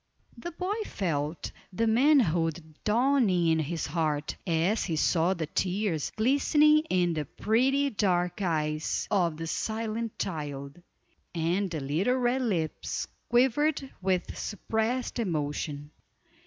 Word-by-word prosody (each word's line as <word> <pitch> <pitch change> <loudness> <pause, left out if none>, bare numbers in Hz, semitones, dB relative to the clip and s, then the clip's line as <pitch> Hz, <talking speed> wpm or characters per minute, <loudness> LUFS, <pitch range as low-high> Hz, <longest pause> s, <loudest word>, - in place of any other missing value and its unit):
The 255 +9 -7
boy 370 +5 -2
felt 155 -4 -2 0.2
the 225 +5 0
manhood 175 - +2
dawning 230 -5 +3
in 160 0 +3
his 160 +1 -2
heart, 150 -1 -1
as 175 +6 +1
he 165 - -1
saw 170 +4 +2
the 165 -3 -2
tears 180 -1 -1
glistening 295 +6 +4
in 175 -2 +2
the 155 -2 -2
pretty 265 - +1
dark 180 -3 0
eyes 155 -4 -1
of 175 -6 +1
the 165 - -4
silent 220 +5 -3
child, 145 -3 -5 0.5
and 175 +4 0
the 160 -4 -4
little 160 - +1
red 250 +1 +1
lips 180 -10 -2 0.2
quivered 265 +3 +2
with 185 -1 -1
suppressed 225 +5 -2
emotion. 150 -5 -3
185 Hz, 120 wpm, -28 LUFS, 160-235 Hz, 0.5 s, glistening